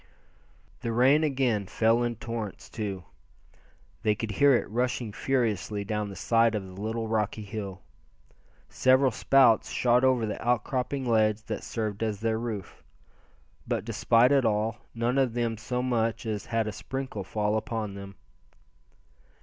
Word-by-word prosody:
The 115 Hz, -, -3 dB
rain 130 Hz, +6 st, +4 dB
again 130 Hz, -9 st, 0 dB
fell 115 Hz, +4 st, +2 dB
in 120 Hz, -1 st, -1 dB
torrents, 115 Hz, -3 st, -6 dB
too. 100 Hz, -4 st, -4 dB, 1.0 s
They 105 Hz, -2 st, +2 dB
could 110 Hz, 0 st, -4 dB
hear 140 Hz, +3 st, +5 dB
it -, -, 0 dB
rushing 120 Hz, 0 st, -1 dB
furiously 110 Hz, -6 st, -1 dB
down 105 Hz, 0 st, -2 dB
the 100 Hz, -, -8 dB
side 115 Hz, +4 st, +2 dB
of 100 Hz, -2 st, -3 dB
the 95 Hz, -, -11 dB
little 110 Hz, +1 st, -2 dB
rocky 110 Hz, -1 st, -1 dB
hill. 100 Hz, -3 st, -6 dB, 0.8 s
Several 130 Hz, +1 st, +3 dB
spouts 125 Hz, -1 st, +4 dB
shot 125 Hz, +1 st, +2 dB
over 130 Hz, -3 st, +3 dB
the 105 Hz, -, -5 dB
outcropping 125 Hz, +3 st, -1 dB
ledge 110 Hz, -2 st, +2 dB
that -, -, -5 dB
served 110 Hz, -2 st, -4 dB
as 110 Hz, -3 st, -1 dB
their 110 Hz, 0 st, 0 dB
roof; 110 Hz, -5 st, -6 dB, 0.9 s
but 115 Hz, -4 st, -1 dB
despite 115 Hz, +2 st, +3 dB
it 140 Hz, -2 st, +4 dB
all, 110 Hz, 0 st, 0 dB, 0.2 s
none 120 Hz, +3 st, +1 dB
of 125 Hz, -4 st, +1 dB
them 120 Hz, -2 st, 0 dB
so 125 Hz, +3 st, -3 dB
much 115 Hz, -3 st, 0 dB
as 105 Hz, -2 st, -3 dB
had 115 Hz, -1 st, 0 dB
a 110 Hz, -, -3 dB
sprinkle 130 Hz, 0 st, -5 dB
fall 105 Hz, +2 st, -1 dB
upon 110 Hz, -2 st, -3 dB
him. 100 Hz, -1 st, -9 dB
115 Hz, 150 wpm, -28 LUFS, 105-120 Hz, 1.0 s, hear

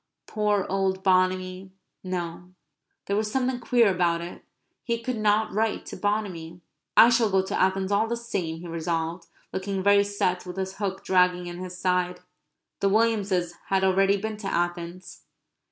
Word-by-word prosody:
Poor 210 Hz, -2 st, 0 dB
old 190 Hz, 0 st, 0 dB
Bonamy! 185 Hz, 0 st, +1 dB, 0.3 s
No; 180 Hz, 0 st, -5 dB, 0.5 s
there 200 Hz, -, -1 dB
was 215 Hz, 0 st, -1 dB
something 255 Hz, 0 st, 0 dB
queer 240 Hz, -1 st, +3 dB
about 175 Hz, -2 st, +1 dB
it. 170 Hz, +1 st, -8 dB, 0.4 s
He 235 Hz, -1 st, -1 dB
could 250 Hz, -2 st, -2 dB
not 215 Hz, +1 st, +2 dB
write 220 Hz, +2 st, 0 dB
to -, -, -7 dB
Bonamy. 185 Hz, -5 st, -3 dB, 0.4 s
"I 230 Hz, -, +9 dB
shall 230 Hz, -2 st, +3 dB
go 190 Hz, -1 st, +2 dB
to 190 Hz, -, -2 dB
Athens 190 Hz, +1 st, +1 dB
all 210 Hz, +3 st, +2 dB
the 235 Hz, +1 st, -2 dB
same," 170 Hz, -8 st, -4 dB
he 175 Hz, -, -8 dB
resolved, 165 Hz, +1 st, -3 dB, 0.3 s
looking 190 Hz, 0 st, -2 dB
very 200 Hz, 0 st, +5 dB
set, 195 Hz, -3 st, -1 dB
with 180 Hz, -1 st, -8 dB
this 190 Hz, 0 st, -4 dB
hook 195 Hz, -2 st, -3 dB
dragging 180 Hz, -1 st, +3 dB
in 175 Hz, 0 st, -7 dB
his 180 Hz, -1 st, -7 dB
side. 180 Hz, -1 st, 0 dB, 0.6 s
The 195 Hz, -, +2 dB
Williamses 200 Hz, -5 st, +1 dB
had 190 Hz, -1 st, +1 dB
already 195 Hz, +1 st, +3 dB
been 215 Hz, +2 st, -4 dB
to 210 Hz, -2 st, -6 dB
Athens. 175 Hz, 0 st, -3 dB
190 Hz, 165 wpm, -26 LUFS, 180-205 Hz, 0.6 s, I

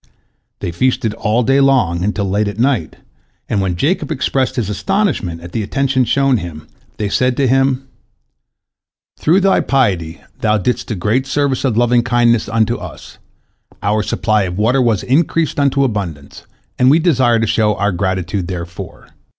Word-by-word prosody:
They -, -, -3 dB
feasted 115 Hz, +3 st, 0 dB
all 110 Hz, +3 st, 0 dB
day 135 Hz, +4 st, +3 dB
long, 125 Hz, -11 st, +2 dB
until 100 Hz, 0 st, -1 dB
late 100 Hz, +2 st, 0 dB
at 100 Hz, 0 st, -5 dB
night, 120 Hz, -, 0 dB, 0.5 s
and 100 Hz, -, 0 dB
when 95 Hz, -2 st, -1 dB
Jacob 150 Hz, -, -1 dB
expressed 130 Hz, 0 st, -1 dB
his 120 Hz, -6 st, -1 dB
astonishment 105 Hz, -, -1 dB
at 85 Hz, +1 st, -10 dB
the 115 Hz, -, -2 dB
attention 130 Hz, +3 st, 0 dB
shown 135 Hz, +2 st, +2 dB
him, 80 Hz, -5 st, -8 dB, 0.3 s
they 105 Hz, -, -2 dB
said 125 Hz, +4 st, 0 dB
to 140 Hz, -, +2 dB
him: 135 Hz, +1 st, +1 dB, 1.3 s
"Through 175 Hz, +6 st, +3 dB
thy 195 Hz, 0 st, +3 dB
piety 95 Hz, -12 st, 0 dB, 0.2 s
thou 105 Hz, 0 st, +2 dB
didst 115 Hz, +5 st, -2 dB
a 110 Hz, -, -2 dB
great 110 Hz, +8 st, 0 dB
service 140 Hz, -1 st, 0 dB
of 125 Hz, -5 st, 0 dB
lovingkindness 120 Hz, -1 st, +2 dB
unto 115 Hz, +2 st, +1 dB
us, -, -, -11 dB, 0.6 s
our 105 Hz, +1 st, +1 dB
supply 110 Hz, 0 st, 0 dB
of 90 Hz, 0 st, -5 dB
water 120 Hz, +6 st, +2 dB
was 115 Hz, -5 st, +1 dB
increased 155 Hz, +3 st, +1 dB
unto 140 Hz, -1 st, +2 dB
abundance, 90 Hz, -, -4 dB, 0.3 s
and 125 Hz, 0 st, +5 dB
we 150 Hz, -, +6 dB
desire 130 Hz, -9 st, +3 dB
to 115 Hz, -, +1 dB
show 105 Hz, -1 st, +1 dB
our 100 Hz, +1 st, 0 dB
gratitude 95 Hz, 0 st, -2 dB
therefor." 85 Hz, -2 st, -7 dB
115 Hz, 160 wpm, -16 LUFS, 100-135 Hz, 1.3 s, we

